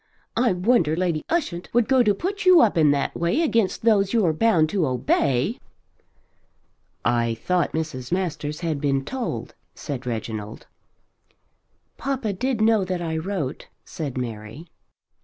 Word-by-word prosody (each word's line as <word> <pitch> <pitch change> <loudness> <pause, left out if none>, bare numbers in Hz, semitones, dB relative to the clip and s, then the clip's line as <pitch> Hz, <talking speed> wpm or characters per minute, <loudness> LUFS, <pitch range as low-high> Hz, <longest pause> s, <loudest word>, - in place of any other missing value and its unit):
I 235 -3 +3
wonder 180 -4 +2
Lady 170 -3 -1
Ushant 270 - -2
would 240 -1 +3
go 265 -1 +4
to 210 -4 +3
put 390 - -3
you 370 -2 +7
up 225 -7 +4
in 155 -3 +4
that 140 -1 +1
way 170 - +1
against 225 - +1
those 205 -3 +3
you're 195 -9 +3
bound 165 -3 +3
to 180 -5 0
obey." 130 - +1 1.5
"I 120 -1 +1
thought 180 +9 0
Mrs. 155 -6 -4
Masters 155 -4 -2
had 160 -5 -2
been 135 -2 0
told," 255 - -4 0.2
said 130 -4 -6
Reginald. 110 -2 -5 1.3
"Papa 260 -6 -2
did 250 +3 -1
know 220 -2 +4
that 180 -1 -3
I 160 -1 -2
wrote," 160 -4 -3 0.2
said 145 -6 -5
Mary. 115 +4 -6
170 Hz, 140 wpm, -23 LUFS, 140-225 Hz, 1.5 s, you